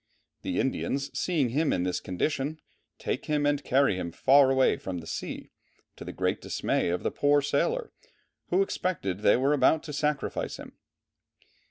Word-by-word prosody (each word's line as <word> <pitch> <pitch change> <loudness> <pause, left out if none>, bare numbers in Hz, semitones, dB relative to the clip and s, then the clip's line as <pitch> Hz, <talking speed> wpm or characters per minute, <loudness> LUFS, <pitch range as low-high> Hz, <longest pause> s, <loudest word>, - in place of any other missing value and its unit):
The 275 -2 -2
Indians 135 +1 -2
seeing 155 -9 +1
him 150 +6 +1
in 90 - 0
this 90 -1 -1
condition, 145 - -2 0.4
take - - -3
him 150 -1 0
and 145 0 +1
carry 135 -7 +2
him 85 -2 -4
far 135 +8 +5
away 130 0 +3
from 95 -2 -5
the 85 - -8
sea, - - -6 0.4
to - - -9
the - - -6
great - - -1
dismay - - -1
of 90 - -2
the - - 0
poor 145 0 +3
sailor, 470 - 0 0.6
who 185 +2 +3
expected 160 - -2
they 105 - +4
were 135 +3 +2
about 155 +2 +3
to 150 - -7
sacrifice 150 0 -2
him. - - -11
140 Hz, 170 wpm, -28 LUFS, 120-150 Hz, 0.6 s, far